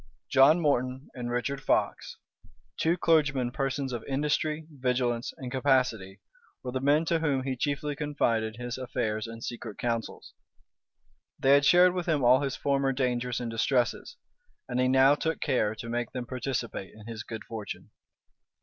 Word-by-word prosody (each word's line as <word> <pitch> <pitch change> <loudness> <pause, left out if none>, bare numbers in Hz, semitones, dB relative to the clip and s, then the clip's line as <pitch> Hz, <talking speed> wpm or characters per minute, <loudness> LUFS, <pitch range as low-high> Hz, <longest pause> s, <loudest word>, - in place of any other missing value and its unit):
John 140 +5 +6
Morton 130 -3 0
and 120 -1 -5
Richard 125 +3 -2
Fox, - - 0 0.6
two 165 +2 +1
clergymen 140 -8 +2
persons 135 -1 -2
of 120 - -4
industry, 150 +3 -1
vigilance, 125 -3 -1
and 125 -2 -7
capacity, 125 -8 +1 0.4
were 125 - -4
the 130 - -2
men 145 +4 +3
to 165 0 +1
whom 140 -5 0
he 130 -1 -2
chiefly 145 +3 -2
confided 115 -7 0
his 120 +1 -5
affairs 115 -4 -2
and 115 0 -9
secret 115 -3 -6
counsels. 115 -2 -3 1.0
They 135 - +3
had 140 0 +5
shared 180 +3 +6
with 180 -1 -3
him 150 -5 +1
all 125 +3 +6
his 135 -2 -2
former 140 -1 +1
dangers 125 -2 -1
and 120 -2 -4
distresses; 120 - 0 0.5
and 125 0 -2
he 130 - +3
now 135 +2 +5
took 160 +2 -2
care 115 -7 0
to 115 - -8
make 120 0 -3
them 125 -2 -4
participate 125 -5 -4
in 110 -1 -13
his 115 -1 -6
good 110 0 -7
fortune. 110 -3 -7
130 Hz, 160 wpm, -28 LUFS, 120-140 Hz, 1.0 s, John